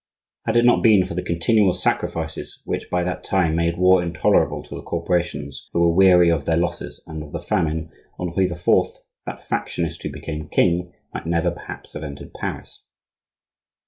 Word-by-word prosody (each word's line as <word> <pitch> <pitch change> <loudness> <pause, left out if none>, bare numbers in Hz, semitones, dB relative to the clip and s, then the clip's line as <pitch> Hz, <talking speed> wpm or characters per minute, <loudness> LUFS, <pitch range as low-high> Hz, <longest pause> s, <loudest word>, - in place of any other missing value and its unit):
Had 115 - +2
it 120 - +4
not 120 - +5
been 105 -5 +5
for 90 - -6
the 90 - -2
continual 90 +4 +2
sacrifices - - -3
which - - -3
by 90 0 0
that 90 0 -3
time 90 -5 +1
made 85 0 0
war 90 0 +5
intolerable 85 -2 +1
to - - -11
the - - -6
corporations, 85 -5 -2
who - - +1
were 85 -1 +4
weary 90 -2 +6
of 75 -4 0
their 80 - +2
losses 85 - -3
and 80 -1 -7
of 75 -1 -10
the - - -4
famine, 80 -1 -1 0.3
Henri 90 +2 0
IV., 90 -1 -5 0.6
that - - -7
factionist 85 0 -2
who - - -3
became 75 +1 -6
king, 90 +1 +2 0.2
might - - -6
never 85 +1 +1
perhaps 85 - -10
have 75 - -6
entered 70 -1 -8
Paris. - - -6
85 Hz, 175 wpm, -22 LUFS, 80-90 Hz, 0.6 s, weary